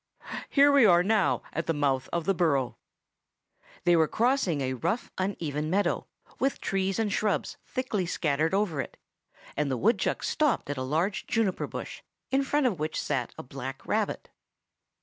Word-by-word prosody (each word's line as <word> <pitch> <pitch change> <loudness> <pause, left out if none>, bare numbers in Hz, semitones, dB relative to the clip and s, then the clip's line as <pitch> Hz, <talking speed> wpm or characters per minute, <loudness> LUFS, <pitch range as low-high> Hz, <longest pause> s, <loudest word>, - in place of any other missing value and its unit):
Here 285 0 +6
we 280 -2 +6
are 175 -4 +6
now 210 +1 +2
at 165 - -2
the 165 - +1
mouth 135 -3 0
of 170 -2 -1
the 195 - +3
burrow." 140 -8 +1 1.1
They 175 0 +5
were 160 -1 +4
crossing 230 - +1
a 130 -1 -1
rough, 165 - -2
uneven 155 -6 -2
meadow, 200 +4 +1 0.3
with 270 +1 0
trees 195 0 -1
and 215 -3 0
shrubs 210 -1 0
thickly 225 -8 -2
scattered 160 +1 +1
over 190 -8 +1
it; - - -9 0.6
and 150 -1 0
the 130 - 0
woodchuck 210 - +1
stopped 300 - +1
at 145 - -4
a - - -2
large 160 +10 -1
juniper 220 -5 0
bush, - - -7 0.3
in 270 +1 +3
front 285 +1 +1
of 205 -10 +1
which 155 +1 -2
sat 130 -5 -2
a - - -6
black 135 +1 -7
rabbit. - - -1
175 Hz, 170 wpm, -28 LUFS, 145-215 Hz, 1.1 s, Here